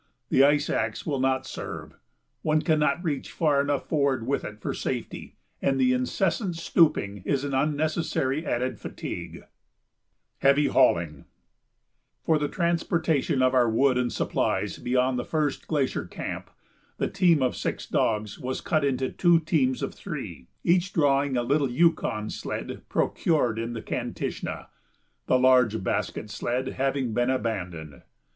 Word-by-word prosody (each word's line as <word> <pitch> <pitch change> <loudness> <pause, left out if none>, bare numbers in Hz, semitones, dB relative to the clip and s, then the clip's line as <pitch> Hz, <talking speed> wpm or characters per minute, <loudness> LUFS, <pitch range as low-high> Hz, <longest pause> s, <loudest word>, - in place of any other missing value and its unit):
The 135 - +5
ice 145 +1 +4
axe - - -2
will 145 -4 -1
not 130 0 +1
serve - - -7 0.5
one 155 0 +1
cannot 155 +1 +2
reach 150 -6 -3
far 150 -4 +2
enough 145 -1 -1
forward 140 -6 +1
with 140 +3 -1
it 105 0 -7
for - - -3
safety, - - -5 0.3
and 135 -1 +1
the 125 -1 +4
incessant 175 - 0
stooping 150 - +2
is 140 +4 0
an 140 -1 -3
unnecessary 150 0 0
added 125 -5 -2
fatigue. - - -6
[Sidenote: - - -23 0.9
Heavy 140 +2 +4
Hauling] 85 - +2 1.0
For 160 -2 +2
the 145 - 0
transportation 165 -5 0
of 130 0 +3
our 125 -3 +4
wood 130 +4 +3
and 125 -1 0
supplies - - -1
beyond 125 0 +1
the - - -2
first 150 -1 -2
glacier 145 -4 0
camp, - - -6 0.5
the - - 0
team 175 -7 +3
of 125 - 0
six - - -3
dogs 105 -2 -1
was 130 +1 -3
cut 155 -4 0
into 130 -2 0
two 175 -2 +4
teams 145 -6 0
of - - -3
three, 65 - -7 0.2
each 180 +2 +2
drawing 140 -3 +2
a 120 - +1
little 140 +2 +1
Yukon 125 -7 +1
sled - - -5
procured 125 -9 +1
in 115 +1 -3
the 115 - -6
Kantishna, - - -4 0.6
the 130 - +4
large 125 -5 +4
basket 105 - -2
sled 125 +4 -2
having 135 -3 -1
been 120 +2 +1
abandoned. 90 - -3
135 Hz, 150 wpm, -26 LUFS, 125-155 Hz, 1.0 s, The